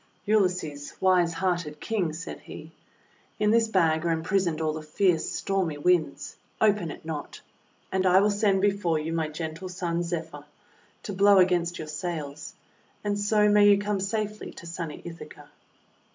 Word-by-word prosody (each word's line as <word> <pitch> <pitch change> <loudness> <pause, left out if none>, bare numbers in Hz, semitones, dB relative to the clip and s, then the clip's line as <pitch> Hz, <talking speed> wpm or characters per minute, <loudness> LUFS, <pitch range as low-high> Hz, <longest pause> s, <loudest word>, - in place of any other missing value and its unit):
'Ulysses, 180 -9 0
wise 180 -2 +3
hearted 175 -3 -2
King," 200 -8 -1
said 160 +2 -7
he, 160 +1 -11 0.7
"in 210 0 +3
this 230 0 +4
bag 165 -6 +2
are 170 - 0
imprisoned 165 0 0
all 155 -1 0
the 155 - -5
fierce 165 +2 +1
stormy 185 -6 -1
Winds. 175 +1 0 0.2
Open 205 -5 +2
it 155 - -9
not! 155 -2 -6 0.5
And 190 0 +1
I 185 +1 +6
will 205 +1 +3
send 200 -2 +2
before 195 -5 +1
you 155 +2 -3
my 160 -1 0
gentle 160 +3 -6
son, 175 -2 -2
Zephyr, 165 -4 -4 0.6
to 205 - -5
blow 200 +1 +5
against 175 -2 +3
your 155 - -6
sails; 155 -2 -5 0.5
and 205 -1 -1
so 210 +1 +3
may 205 0 +6
you 200 - +6
come 205 0 -1
safely 210 +1 -3
to - - -12
sunny 170 -2 -6
Ithaca." 170 -1 -10
175 Hz, 160 wpm, -27 LUFS, 160-200 Hz, 0.7 s, I